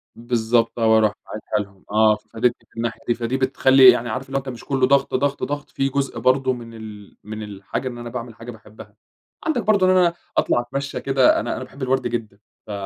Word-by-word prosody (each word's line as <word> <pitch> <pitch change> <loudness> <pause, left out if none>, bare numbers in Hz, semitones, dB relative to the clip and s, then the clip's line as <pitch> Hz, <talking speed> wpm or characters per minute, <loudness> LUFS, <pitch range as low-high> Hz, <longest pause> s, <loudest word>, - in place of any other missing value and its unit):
بالضبط، 115 0 0
آه، 115 - +2
وأرُوح 110 -1 +4
باعتها 105 -1 -3
لهم 100 -1 -23
آه، 110 0 +4
فادتني 115 +3 -2
في - - -23
الناحية 115 -1 -3
دي، 120 - +3
فدي 115 +2 -2
بتخلّي 130 0 +6
يعني 120 -1 -2
عارف 130 +4 -3
اللي 135 +1 -2
هو - - +2
أنت 135 - -8
مش 120 -3 -8
كُلّه 135 -2 +2
ضغط، 140 0 +2
ضغط، 140 +2 0
ضغط 145 0 -4
في 135 0 -1
جزء 140 0 -2
برضه 130 0 +2
من 115 -2 -9
ال 105 -2 -11
من 110 +1 -7
الحاجة 105 +5 -5
إن 120 - -6
أنا 120 0 -7
باعمل 115 -1 -7
حاجة 120 +1 -9
باحبها، 105 -1 -14 0.5
عندك 310 -7 0
برضه 205 -3 +3
إن 185 - +4
أنا 175 -2 +4 0.2
أطلع - - +2
أتمشى 140 +3 -5
كده، 135 -2 +3
أنا 120 - -3
أنا - - -5
باحب 130 +2 -13
الوَرْد 130 -1 0
جدًا 110 -4 -5 0.3
ف - - -7
120 Hz, 220 wpm, -22 LUFS, 110-135 Hz, 0.5 s, بتخلّي